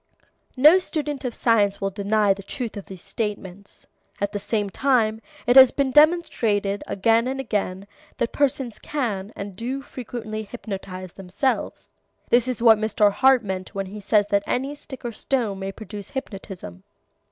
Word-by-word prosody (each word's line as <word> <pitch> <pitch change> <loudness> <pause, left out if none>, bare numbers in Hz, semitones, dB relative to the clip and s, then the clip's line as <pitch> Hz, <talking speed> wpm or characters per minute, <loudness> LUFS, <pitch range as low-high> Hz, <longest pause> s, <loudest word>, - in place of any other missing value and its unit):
No 305 +8 +7
student 295 -6 -3
of 240 - -3
science 205 -4 +2
will 195 0 -1
deny 205 +1 +2
the 195 - -10
truth 230 +3 -6
of 200 - -8
these 190 -2 -11
statements. 200 -2 -5 0.3
At 200 0 -1
the 205 - -3
same 205 0 -1
time 225 -3 +1 0.2
it 245 0 +3
has 265 -1 +10
been 275 -2 0
demonstrated 230 - +3
again 225 +4 +2
and 265 +1 -3
again 200 -6 -2 0.3
that 235 - -1
persons 265 -5 0
can 215 -9 -3
and 200 -1 -7
do 255 +6 -4
frequently 230 -5 -6
hypnotize 195 -4 -7
themselves. 195 +8 -3 0.4
This 240 +1 +4
is 250 -2 -3
what 225 -2 +7
Mr. 215 -1 +3
Hart 260 +4 +4
means 190 -2 -5
when 195 0 -2
he 200 +3 -8
says 205 +1 +2
that 200 0 +3
any 270 +3 -1
stick 270 -3 -11
or 240 - -2
stone 225 -4 -2
may 195 0 -4
produce 205 -1 -9
hypnotism. 195 - -7
215 Hz, 165 wpm, -23 LUFS, 200-255 Hz, 0.4 s, has